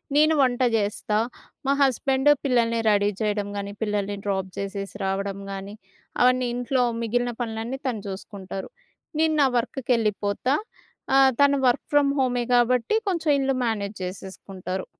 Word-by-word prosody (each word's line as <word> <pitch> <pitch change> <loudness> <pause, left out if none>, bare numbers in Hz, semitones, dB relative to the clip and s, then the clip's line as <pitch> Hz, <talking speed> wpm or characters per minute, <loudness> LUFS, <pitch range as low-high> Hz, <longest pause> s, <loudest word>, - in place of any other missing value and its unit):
నేను 310 +2 +5
వంట 255 -1 +2
జేస్తా. 210 0 0 0.5
మా 275 - +2
హస్బెండ్ 270 +1 +3 0.2
పిల్లల్ని 230 -3 +2
రెడీ 205 0 +3
చేయడం 205 -1 0
గానీ, 200 0 -4
పిల్లల్ని 205 -1 -1
డ్రాప్ 190 -1 -1
జేసేసి 200 0 -5
రావడం 195 +1 -2
గానీ 195 +2 -6 0.5
అవన్నీ 255 0 +4
ఇంట్లో 245 +1 +1 0.2
మిగిలిన 245 +2 0
పనులన్నీ 225 +3 -3
తను 225 -5 -2
జూసుకుంటారు. 195 0 -7 0.5
నేను 320 -1 +3
నా 275 - +5
వర్క్‌కేళ్ళిపోతా 230 -1 0 0.6
ఆహ్, 270 -1 +6
తను 280 0 +5
వర్క్ 245 - +1
ఫ్రమ్ 285 -1 +4
హోమే 245 -2 +1
గాబట్టి 245 - +3
కొంచెం 330 -4 +1
ఇల్లు 270 -1 +1
మేనేజ్ 210 -2 -2
జేసేసుకుంటారు. 185 0 -6
230 Hz, 130 wpm, -24 LUFS, 200-260 Hz, 0.6 s, ఆహ్